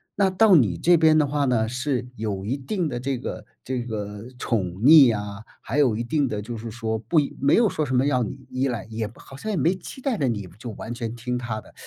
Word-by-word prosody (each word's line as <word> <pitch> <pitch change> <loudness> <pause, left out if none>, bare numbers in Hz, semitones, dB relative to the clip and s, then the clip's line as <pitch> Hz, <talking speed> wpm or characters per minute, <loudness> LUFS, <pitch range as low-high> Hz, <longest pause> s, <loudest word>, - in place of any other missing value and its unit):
那 195 -1 +3
到 195 0 +5
你 105 - +3
这 175 - +4
边 155 -1 +5
的 150 - +4
话 145 0 0
呢， 115 -4 +1
是 125 +1 -2
有 105 -3 -3
一 125 +6 -1
定 170 +5 -2
的 120 - -3
这 135 0 -2
个 125 - -6 0.2
这 130 -1 -3
个 105 -2 -5
宠 110 -7 -1 0.2
溺 135 -6 +8
啊， 105 +1 -7 0.2
还 140 +6 -2
有 125 -7 +4
一 115 - -2
定 145 +3 0
的 105 -4 -3
就 120 +1 -6
是 115 +1 -6
说 110 -1 -3
不 115 +9 +2
一 145 - -2
没 140 - +4
有 230 -1 +5
说 155 - -2
什 130 - -1
么 130 +2 +3
要 130 -3 +2
你 130 +4 -5
依 130 +1 0
赖， 115 -6 -3
也 110 -1 -2
不 110 - -16
好 135 - -13
像 215 - -6
也 200 - -1
没 165 +5 +3
期 190 +8 -10
待 260 -5 -1
着 140 - +1
你 105 -5 -2
就 120 - -7
完 110 +2 -7
全 115 -1 -5
听 125 +1 -3
他 115 -3 -4
的， - - -19
125 Hz, 280 characters per minute, -24 LUFS, 110-145 Hz, 0.2 s, 溺